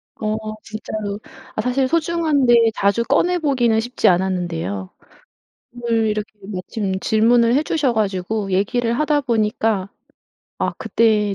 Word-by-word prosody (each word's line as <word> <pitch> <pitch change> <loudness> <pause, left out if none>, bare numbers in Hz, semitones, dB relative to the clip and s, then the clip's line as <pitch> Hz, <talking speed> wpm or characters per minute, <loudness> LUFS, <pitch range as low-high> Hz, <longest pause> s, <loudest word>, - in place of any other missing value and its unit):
어 215 0 -2 0.3
진짜로. 215 -2 -5 0.4
아 215 - 0
사실 255 +2 +1
소중한데 290 -8 +3
자주 200 +4 +2
꺼내 350 +8 +2
보기는 250 -8 +2
쉽지 245 +2 0
않았는데요. 175 - 0 0.8
오늘 235 -2 0
이렇게 210 0 -3 0.2
마침 190 0 -3
질문을 230 +3 +3
해 290 - +2
주셔 295 -6 0
가지고 200 -1 -1
얘기를 230 +5 +1
하다 300 -1 +2
보니까 215 -4 0 0.7
아 - - 0
그때 210 -3 +2
220 Hz, 275 characters per minute, -20 LUFS, 200-245 Hz, 0.8 s, 소중한데